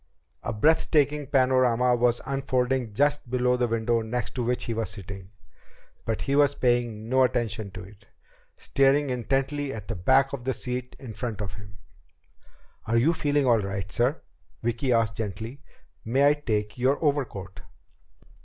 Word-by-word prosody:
A - - -3
breath 155 +10 +2
taking 150 -1 +2
panorama 125 -2 +3
was 120 0 +2
unfolding 130 -3 0
just 145 +3 +1
below 125 0 +2
the 125 -1 +1
window 115 0 0
next 110 -2 -4
to 125 - -2
which 125 +1 0
he 115 - -2
was 110 -3 -2
sitting. 95 -2 -8 0.8
But 110 -1 -2
he 140 - 0
was 145 -1 +4
paying 120 -3 0
no 130 +2 +3
attention 115 -4 -1
to 95 +1 -9
it, 100 +2 -16 0.5
staring 140 +1 +2
intently 135 +3 -1
at 110 -4 -8
the - - -2
back 130 +10 +3
of 135 -3 -5
the 130 +1 -1
seat 125 0 -5
in 120 -5 -9
front 115 -3 -4
of 100 -3 -4
him. 100 0 -12 1.1
"Are 115 +1 +2
you 145 +9 +4
feeling 145 -3 +1
all 120 -3 +4
right, 95 -1 -4
sir?" 125 +8 0 0.4
Vicki 120 +3 0
asked 115 -3 +1
gently. 110 +5 -5 0.4
"May 135 +5 +3
I - - +5
take 110 -7 -3
your 130 +3 +2
overcoat?" 120 -10 -2
125 Hz, 165 wpm, -26 LUFS, 110-135 Hz, 1.1 s, I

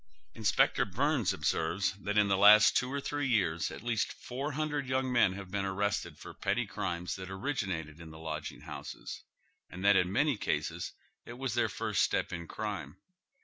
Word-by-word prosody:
Inspector 110 -3 +3
Byrnes - - +1
observes 85 +5 0
that 105 +2 -2
in 105 -1 +5
the 100 - +3
last 105 +2 +8
two 125 +1 +1
or 140 - -1
three 145 0 -2
years 85 -9 +1
at - - -9
least 120 -3 0
four 135 +4 -5
hundred 150 -2 -2
young 130 0 0
men 120 -6 +4
have 95 -1 -8
been 100 0 -1
arrested 95 -4 -1
for - - -10
petty - - 0
crimes 85 0 -3
that 95 0 -7
originated 95 - -3
in 85 -1 -10
the 80 - -11
lodging 80 -1 -5
houses, - - -7 0.5
and 90 +2 -6
that 100 0 +7
in 90 -1 +3
many 140 +3 +2
cases - - -2 0.3
it 120 - -9
was 130 -1 -3
their 120 -2 +2
first - - -1
step - - +1
in 85 -1 -5
crime. 95 -8 -5
100 Hz, 185 wpm, -31 LUFS, 90-125 Hz, 0.5 s, last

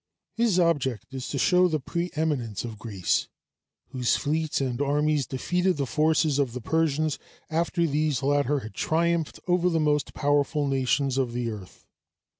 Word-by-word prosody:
His 230 -5 +2
object 140 -8 0
is 130 -2 -5
to 140 - -3
show 180 +6 +4
the 155 -3 -1
preëminence 150 - -2
of 110 -3 -7
Greece, 100 -6 -1 0.6
whose 125 -2 +1
fleets 155 +1 -1
and 130 -2 -2
armies 145 0 +1
defeated 180 +6 0
the 140 - 0
forces 155 +2 +2
of 135 -5 0
the 125 - -4
Persians 155 +2 0 0.3
after 170 +1 +1
these 150 -3 0
latter 145 0 +1
had 110 -3 -9
triumphed 165 +5 0
over 180 0 +3
the 165 -2 +1
most 150 -2 0
powerful 145 0 +1
nations 135 0 +1
of 125 -3 -1
the 120 -1 -2
earth. 100 -4 -11
145 Hz, 155 wpm, -26 LUFS, 130-160 Hz, 0.6 s, show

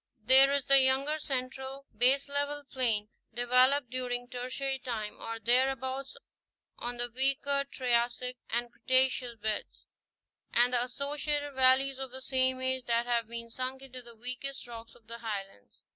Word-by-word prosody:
There 265 +4 +7
is 280 -1 0
the 275 0 +7
younger 270 +4 +2
central 265 0 -4
baselevelled 280 +4 +1
plain, 225 -5 0 0.3
developed 250 +2 +3
during 245 -1 -3
Tertiary 260 +2 -4
time, 225 -5 -5
or 230 0 -5
thereabouts, 260 +3 0 0.6
on 240 0 -4
the 240 0 -2
weaker 275 +2 +1
Triassic 250 0 -1
and 240 +1 -1
Creta 260 0 +3
ceous 245 -3 -5
beds; 215 0 -4 0.7
and 245 +1 +3
the 245 -1 +3
associated 290 +2 -3
valleys 265 +1 +4
of 265 -1 -4
the 260 +1 -7
same 260 0 +1
age 260 -1 -1
that 235 0 +1
have 235 -2 0
been 230 0 -7
sunk 260 +2 -4
into 255 -1 -10
the 235 -1 -14
weakest 255 +4 -6
rocks 230 -1 -10
of 225 - -22
the 230 +1 -8
Highlands. 195 - -7
255 Hz, 150 wpm, -30 LUFS, 240-270 Hz, 0.7 s, There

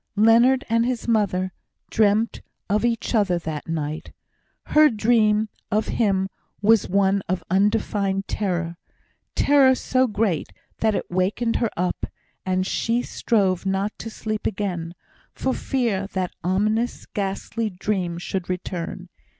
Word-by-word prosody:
Leonard 235 +5 +5
and 230 0 +2
his 245 -1 -2
mother 190 -5 +1 0.4
dreamt 215 +1 +2 0.3
of 210 +3 +1
each 235 -1 0
other 200 -6 +3
that 155 -3 -5
night. 155 -1 -3 0.5
Her 305 0 +6
dream 215 -1 +3 0.2
of 215 0 0
him 195 -4 +1 0.3
was 215 0 +4
one 195 +1 +3
of 180 -2 -1
undefined 200 0 +1
terror 175 -4 -2 0.6
terror 275 -2 +5
so 255 0 +1
great 205 -7 -1 0.3
that 220 -2 +2
it - - -4
wakened 200 +6 0
her 230 - +1
up, 180 +1 -1 0.4
and 185 0 +1
she 230 +5 0
strove 195 -6 +1
not 195 +2 0
to 225 - -5
sleep 215 -1 -3
again, 180 -5 -3 0.4
for 260 - -1
fear 225 -7 -1
that 185 -2 -2
ominous 215 +6 0
ghastly 205 +2 -3
dream 185 -2 -2
should 175 +1 -4
return. 180 0 -4
205 Hz, 130 wpm, -23 LUFS, 185-225 Hz, 0.6 s, Her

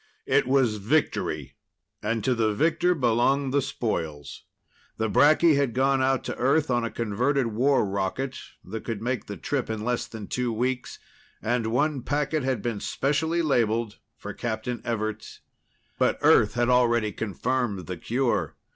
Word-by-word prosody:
It - - +2
was 130 -5 +2
victory, 135 +10 -1 0.4
and 115 +1 -1
to 130 - +2
the 110 -3 +1
victor 165 +6 +2
belonged 130 +1 +1
the 140 - +3
spoils. 80 - -4 0.5
The 110 -1 -1
bracky 155 +1 +5
had 140 -5 0
gone 135 +1 +2
out 130 -1 +1
to - - -4
Earth 140 +3 +2
on 120 -1 +1
a 115 - -1
converted 120 +5 0
war 130 +3 +2
rocket 100 +7 -2 0.3
that 110 +4 -6
could 115 -3 -4
make 125 -1 -3
the 100 - -6
trip 135 -5 -2
in 110 -1 -3
less 125 0 -1
than 110 -2 -8
two 125 +2 -2
weeks, 125 +2 -2 0.4
and 115 0 -1
one 140 +4 0
packet 150 +4 -1
had 130 -5 -1
been 115 -4 -2
specially 160 +8 0
labeled 115 -6 0 0.2
for - - -7
Captain 120 +1 -4
Everts. 110 -2 -4 0.6
But - - +2
Earth - - +5
had 120 0 +1
already 120 -3 +3
confirmed 115 -1 -2
the 90 -1 -5
cure. 120 +8 -1
120 Hz, 155 wpm, -26 LUFS, 110-135 Hz, 0.6 s, bracky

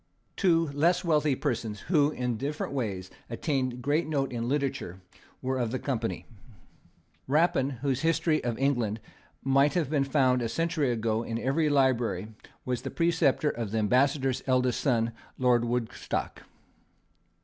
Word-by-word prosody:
Two 165 -5 +2
less 165 +6 +2
wealthy 150 -4 +2
persons, 115 -6 -3
who, 150 -4 +3
in 125 -5 -2
different 140 +4 -3
ways, 100 -8 -3 0.2
attained 130 -1 -2
great 150 +4 +1
note 140 -3 -1
in 120 -1 -3
literature, 135 -10 -2 0.4
were 130 0 -1
of 120 -2 0
the 130 - -2
company. 120 -4 -3 1.0
Rapin, 145 -2 +2
whose 135 -2 0
history 160 0 +1
of 120 -2 -2
England 120 -6 0 0.4
might 135 +3 +3
have 160 -5 0
been 145 -3 +2
found, 130 -2 +2
a 115 - -1
century 160 0 0
ago, 110 -1 0
in 115 -1 -4
every 145 +6 +1
library, 120 -8 +1 0.4
was 125 -2 -2
the 135 - -5
preceptor 165 -3 +2
of 115 -3 -4
the 110 - -2
ambassador's 130 +4 +2
eldest 125 -1 +2
son, 115 -5 +1 0.3
Lord 125 -2 +3
Woodstock. 120 -1 -3
130 Hz, 145 wpm, -28 LUFS, 120-145 Hz, 1.0 s, who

